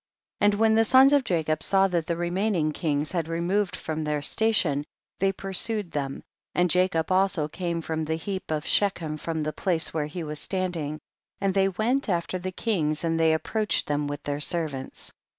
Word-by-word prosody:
3. - - +3
And 205 - +4
when 220 +1 +3
the 225 +1 +5
sons 265 +5 +6
of 285 -2 +4
Jacob 160 -7 0
saw 195 0 +4
that 170 -3 -1
the 170 - -1
remaining 175 -2 0
kings 150 -1 -1
had 170 -3 -1
re 165 0 -3
moved 190 +3 0
from 155 0 -4
their 150 -1 -1
station, 185 -9 +2 0.4
they 195 0 +3
pur 195 0 -7
sued 210 -2 +1
them, 135 -2 -4 0.3
and 180 -1 +3
Jacob 180 -2 +1
also 185 -5 +2
came 170 +1 -3
from 160 -1 -2
the 160 +1 -1
heap 190 +4 -5
of 155 -1 -2
Shechem 170 -7 0
from 160 0 -3
the 155 0 -3
place 170 -4 0
where 155 -2 -1
he 165 +3 -6
was 150 -1 -5
standing, 170 -6 -3 0.4
and 195 -1 0
they 195 0 +3
went 230 +7 0
after 175 0 -1
the 185 +1 -4
kings 165 -7 -1
and 165 -1 0
they 160 0 +4
ap 160 - 0
proached 215 -2 +1
them 145 0 -1
with 145 0 -5
their 145 0 -3
servants. 155 -5 -3
170 Hz, 205 wpm, -26 LUFS, 155-195 Hz, 0.4 s, sons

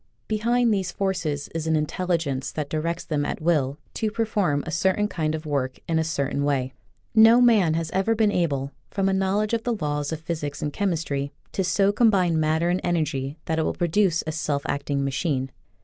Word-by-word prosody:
Behind 230 +2 +2
these 190 -3 -1
forces 170 -8 -2
is 165 -1 -3
an 160 - +2
intelligence 155 -3 -1
that 150 -2 -4
directs 165 +2 -2
them 150 -2 -1
at - - -3
will 150 -4 +1 0.2
to 220 - -1
perform 210 -10 0
a 165 - -4
certain 190 +5 +1
kind 160 -5 -1
of 155 0 -7
work 135 -3 -1
in 165 -1 +1
a - - +2
certain 140 -3 -1
way. 135 -2 0 0.4
No 225 +2 +7
man 215 -10 +4
has 165 -1 -2
ever 195 +4 +1
been 215 -1 +3
able, 140 -7 0 0.2
from 195 -1 0
a 195 - +2
knowl 190 +2 +1
edge 215 +1 -2
of 230 - +1
the 240 0 -1
laws 145 -1 -2
of 160 - -3
physics 160 -3 -4
and 145 -1 -3
chemistry, 155 -7 -1 0.2
to 190 - -1
so 195 +2 +3
combine 195 -7 +3
matter 160 +2 +1
and 180 - 0
energy 150 -5 -1
that 160 0 -1
it - - +2
will - - -1
produce 175 0 +2
a 155 - -2
self 150 -2 -2
acting 140 -1 -1
machine. 135 -1 -1
165 Hz, 200 wpm, -24 LUFS, 145-195 Hz, 0.4 s, No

